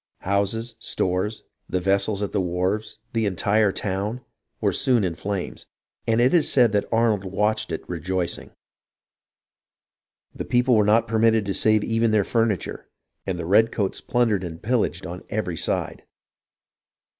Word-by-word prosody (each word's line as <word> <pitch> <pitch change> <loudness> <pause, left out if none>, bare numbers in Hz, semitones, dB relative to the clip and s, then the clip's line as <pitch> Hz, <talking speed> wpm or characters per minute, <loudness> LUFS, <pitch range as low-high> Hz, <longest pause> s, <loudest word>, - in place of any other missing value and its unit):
Houses, 100 +4 -1
stores, 95 +2 -2 0.3
the 90 - 0
vessels 100 +2 +1
at 100 - -3
the 100 - 0
wharves, 95 +4 -2 0.2
the 115 -2 +1
entire 100 +2 +2
town, 100 +6 -3 0.4
were - - +1
soon 125 -5 +2
in 90 -3 -1
flames, 95 +2 -5 0.4
and 115 0 +2
it 125 +5 +4
is 165 -4 +4
said 120 -6 +4 0.2
Arnold 115 -3 +2
watched 105 +2 -1
it 80 - -5
rejoicing. 90 +1 -2 1.8
The - - -5
people 125 0 +2
were 105 - +4
not 110 +3 +3
permitted 110 -1 +3
to 100 - -1
save 110 +2 +3
even 115 0 +1
their 110 -2 +3
furniture, 115 -4 -1 0.4
and 95 -2 -1
the 85 - -4
redcoats 105 +1 +2
plundered 115 -6 +1
and 80 -2 -6
pillaged 115 -1 -1
on 90 0 -7
every 100 -5 -2
side. - - -2
105 Hz, 145 wpm, -24 LUFS, 95-115 Hz, 1.8 s, it